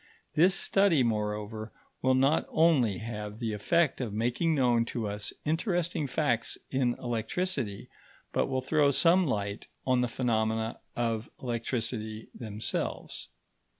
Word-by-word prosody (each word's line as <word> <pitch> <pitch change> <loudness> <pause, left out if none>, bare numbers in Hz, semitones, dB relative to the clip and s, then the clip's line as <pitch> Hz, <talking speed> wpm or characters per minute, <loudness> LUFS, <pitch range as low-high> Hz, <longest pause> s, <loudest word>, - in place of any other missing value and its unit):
This 180 +5 +5
study, 195 -10 +4
moreover, 105 0 -2 0.3
will 130 0 +3
not 135 +4 +3
only 140 - +3
have 105 -1 -5
the 115 -2 -2
effect 150 +9 +2
of 120 -4 -2
making 120 +10 +1
known 120 -4 +3
to 115 -2 -3
us 105 0 -3
interesting 170 -1 0
facts 125 -4 0
in 130 -2 +1
electricity, 120 - -2 0.4
but - - +1
will 130 -1 -1
throw 145 +2 +3
some 170 +5 +4
light 100 -4 -2 0.2
on 130 -1 +3
the 125 - +2
phenomena 110 -2 0 0.2
of 115 -1 -1
electricity 115 -2 -3
themselves." 110 -3 -4
120 Hz, 125 wpm, -29 LUFS, 110-145 Hz, 0.4 s, This